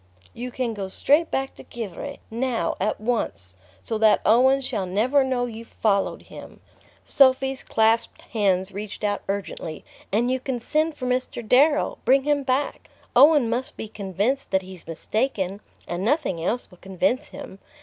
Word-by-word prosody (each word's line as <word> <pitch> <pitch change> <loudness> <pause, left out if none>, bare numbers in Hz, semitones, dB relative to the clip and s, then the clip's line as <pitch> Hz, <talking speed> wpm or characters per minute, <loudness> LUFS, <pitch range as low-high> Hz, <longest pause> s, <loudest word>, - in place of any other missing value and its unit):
"You 250 +1 -5
can 245 -2 -2
go 200 -3 -4
straight 295 - +2
back 270 0 -2
to - - -13
Givre 240 +5 -6
now, 235 -6 -1
at 210 - 0
once! 215 - -1 0.3
So 220 -2 -2
that 220 -1 +5
Owen 260 +5 +5
shall 220 -8 -3
never 245 +10 +2
know 255 -2 0
you've 230 -1 -8
followed 200 -3 0
him." - - -12 0.5
Sophy's 265 -1 +3
clasped 225 +1 +1
hands 195 -4 0
reached 205 +2 -7
out 205 -1 0
urgently. 195 -5 -4 0.3
"And 235 +5 +2
you 260 - 0
can 255 -1 -3
send 310 +6 0
for 255 - -6
Mr. 250 -2 -2
Darrow 290 +5 +3
bring 270 +1 +4
him 290 0 +1
back. 270 +1 -1 0.3
Owen 285 0 +7
must 240 +3 -3
be 220 - -5
convinced 210 +6 -2
that 190 -1 +1
he's 185 -3 -12
mistaken, 200 - -2 0.3
and 175 +2 -3
nothing 230 - 0
else 235 +6 -1
will 180 - -17
convince 195 - -1
him. 280 -9 -10
230 Hz, 160 wpm, -24 LUFS, 200-265 Hz, 0.5 s, Owen